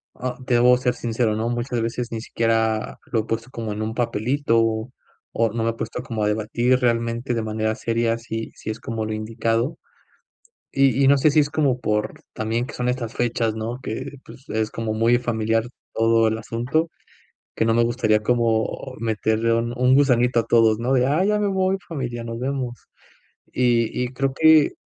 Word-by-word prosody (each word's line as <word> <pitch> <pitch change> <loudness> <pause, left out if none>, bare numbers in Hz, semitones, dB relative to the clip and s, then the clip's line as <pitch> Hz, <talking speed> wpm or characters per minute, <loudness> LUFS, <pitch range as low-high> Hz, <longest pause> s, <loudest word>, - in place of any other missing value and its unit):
ah, 125 0 -4
debo 125 0 +5
ser 125 -1 0
sincero, 115 -2 -1
¿no?, 115 +2 -1
muchas 120 0 -2
veces 120 +1 -3
ni 110 -1 -4
siquiera 115 -1 0
lo 115 - +2
he - - -8
puesto 115 +2 -3
como 115 -4 -5
en 105 - -5
un 110 +1 -2
papelito, 115 +1 +1 0.7
o 115 -1 +1
no 115 - -1
me 115 - +1
he - - -8
puesto - - -5
como 110 -3 -3
a - - +2
debatir 115 +4 +1
realmente 115 0 0
de 115 - -1
manera 110 0 -1
seria 115 0 0
si 115 -1 -5
si - - -7
es 110 - -4
como 110 -1 -4
lo 110 - -3
indicado, 115 +4 -1 1.0
y 135 0 +3
y - - +5
no 140 0 +5
sé 150 +3 +4
si 155 - +4
es 145 0 0
como 140 -5 +1
por 105 -1 -1 0.2
también 115 +3 -2
que - - -9
son 125 0 -2
estas 125 -2 -2
fechas, 115 -2 0
¿no?, 115 +3 -4
que 130 +5 -5
pues, 130 - -15
es 110 0 -1
como 115 -1 -3
muy 115 +2 +3
familiar 115 -2 0 0.3
todo 115 0 +3
el 110 - -1
asunto 120 +9 -1 0.7
que - - +1
no 115 - +3
me 120 0 +4
gustaría 115 -3 +2
como 115 +2 0
meterle 110 0 0
un 115 +1 0
un 125 +1 +4
gusanito 125 -4 +3
a - - -8
todos, 115 -2 +4
¿no?, 125 +3 0
de, 125 -1 +3
ah, 155 +6 +2
ya 210 +1 +2
me 205 - +1
voy 190 0 +1
familia, 125 -7 -4
nos 115 0 -5
vemos 130 -2 -4 0.6
y 120 -2 +2
y - - -1
creo 135 +1 -1
que 160 0 +5
115 Hz, 195 wpm, -23 LUFS, 110-125 Hz, 1.0 s, debo